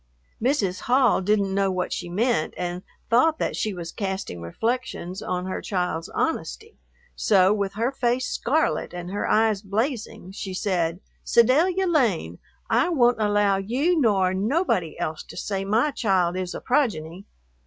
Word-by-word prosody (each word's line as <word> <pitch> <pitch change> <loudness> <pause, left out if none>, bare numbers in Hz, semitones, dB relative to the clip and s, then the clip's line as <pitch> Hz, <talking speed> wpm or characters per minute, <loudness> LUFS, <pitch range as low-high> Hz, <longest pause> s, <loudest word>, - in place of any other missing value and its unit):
Mrs. 215 -8 +1
Hall 250 -4 +3
didn't 200 0 +1
know 195 0 +2
what 185 -1 -2
she 175 - -5
meant 210 -2 0
and 180 0 -3 0.3
thought 310 +7 +4
that - - -2
she 215 - -1
was 170 -3 -6
casting 190 - -4
reflections 210 - -3
on 180 0 -3
her 185 - -4
child's 180 -3 -2
honesty, 435 +7 -3 0.4
so 195 -1 +4
with 200 -2 -2
her 230 +4 0
face 250 -1 0
scarlet 285 - 0
and 175 +1 -6
her 205 - -2
eyes 215 -2 +3
blazing 215 -2 -3
she 190 -1 -6
said, 175 -3 -1 0.2
"Sedalia 325 +11 +3
Lane, 225 - +1 0.3
I 240 +9 +2
won't 245 -8 +3
allow 205 -1 +3
you 255 - +1
nor 195 -6 +3
nobody 200 - 0
else 155 0 -3
to - - -12
say 195 -2 -2
my 225 +9 +2
child 185 -8 +1
is 185 -1 -3
a - - -6
progeny. 195 - -1
200 Hz, 155 wpm, -24 LUFS, 185-245 Hz, 0.4 s, thought